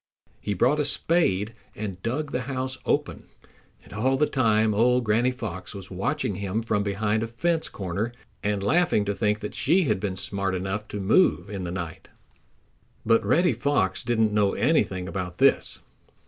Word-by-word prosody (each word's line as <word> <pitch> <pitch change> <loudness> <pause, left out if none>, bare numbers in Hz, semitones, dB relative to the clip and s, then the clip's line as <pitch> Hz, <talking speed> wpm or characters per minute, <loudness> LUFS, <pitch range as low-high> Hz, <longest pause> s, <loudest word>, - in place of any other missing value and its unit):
He 105 - -3
brought 130 +10 +3
a - - +3
spade 125 - +1 0.2
and 95 -3 -5
dug 140 +7 -2
the 125 - -1
house 130 0 -3
open, - - -1 0.6
and - - -14
all 130 +6 +1
the 150 - +3
time 110 -6 +2
old 125 +4 +3
Granny 115 +3 +2
Fox 105 -8 -6
was 95 -1 -9
watching 125 +6 -1
him 100 +3 -2
from 110 -2 0
behind 105 +2 0
a 115 - -2
fence 160 +8 -1
corner 100 +4 -3 0.3
and 105 -1 -1
laughing 165 - +2
to 100 - 0
think 105 0 0
that 105 - -5
she 175 +8 +2
had 105 - 0
been 95 -2 -3
smart 95 0 -1
enough 95 +3 -3
to 105 - -5
move 100 - +3
in 95 -3 -4
the 85 - -4
night. 85 -3 -6 1.0
But 115 0 +4
Reddy 165 - +3
Fox 95 -10 0
didn't 110 -2 +1
know 105 -2 +2
anything 90 -1 +1
about 90 -2 -5
this. - - +2
105 Hz, 175 wpm, -25 LUFS, 95-125 Hz, 1.0 s, But